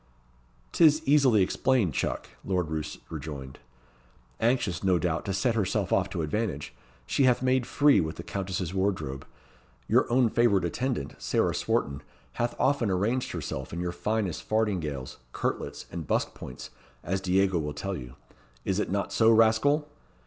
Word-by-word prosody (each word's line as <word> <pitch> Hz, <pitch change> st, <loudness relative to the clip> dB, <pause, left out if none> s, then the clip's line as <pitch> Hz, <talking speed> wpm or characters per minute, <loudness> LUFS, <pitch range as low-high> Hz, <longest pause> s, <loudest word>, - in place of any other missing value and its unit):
"'T -, -, +2 dB
is 155 Hz, 0 st, +6 dB
easily 135 Hz, -8 st, +5 dB
explained, 105 Hz, -, +1 dB
chuck," -, -, -2 dB, 0.2 s
Lord 90 Hz, -4 st, -1 dB
Roos 80 Hz, -1 st, -4 dB
rejoined. 70 Hz, -4 st, -7 dB, 0.8 s
"Anxious, 110 Hz, -8 st, +1 dB
no 95 Hz, -2 st, +3 dB
doubt, 85 Hz, -2 st, -1 dB
to 100 Hz, -, -2 dB
set 115 Hz, +5 st, +1 dB
herself 105 Hz, -5 st, 0 dB
off -, -, +2 dB
to 80 Hz, -, -3 dB
advantage, 105 Hz, -, -2 dB, 0.3 s
she 135 Hz, -, +2 dB
hath 125 Hz, 0 st, +3 dB
made 130 Hz, -1 st, +2 dB
free 145 Hz, 0 st, +4 dB
with 80 Hz, -1 st, -3 dB
the -, -, -7 dB
countess's 95 Hz, -3 st, -3 dB
wardrobe. 90 Hz, -9 st, -2 dB, 0.6 s
Your -, -, +3 dB
own 125 Hz, 0 st, +4 dB
favourite 105 Hz, -6 st, +3 dB
attendant, 120 Hz, -, -2 dB
Sarah -, -, +1 dB
Swarton, 70 Hz, +1 st, -1 dB, 0.4 s
hath 120 Hz, 0 st, 0 dB
often 135 Hz, -5 st, +2 dB
arranged 105 Hz, +7 st, 0 dB
herself 65 Hz, 0 st, -5 dB
in 85 Hz, -, -4 dB
your 90 Hz, 0 st, -2 dB
finest 105 Hz, -1 st, -2 dB
fardingales, 90 Hz, -12 st, -1 dB, 0.2 s
kirtlets, -, -, -3 dB
and 80 Hz, -4 st, -6 dB
busk -, -, 0 dB
points, 65 Hz, -, -9 dB, 0.3 s
as 95 Hz, +1 st, -1 dB
Diego 95 Hz, -1 st, +2 dB
will 75 Hz, -1 st, -3 dB
tell 95 Hz, +6 st, -3 dB
you. 60 Hz, -6 st, -8 dB, 0.5 s
Is 95 Hz, +1 st, 0 dB
it -, -, -1 dB
not 100 Hz, -1 st, -2 dB
so, 110 Hz, 0 st, +5 dB
rascal?" 115 Hz, +7 st, +4 dB
95 Hz, 155 wpm, -28 LUFS, 80-120 Hz, 0.8 s, is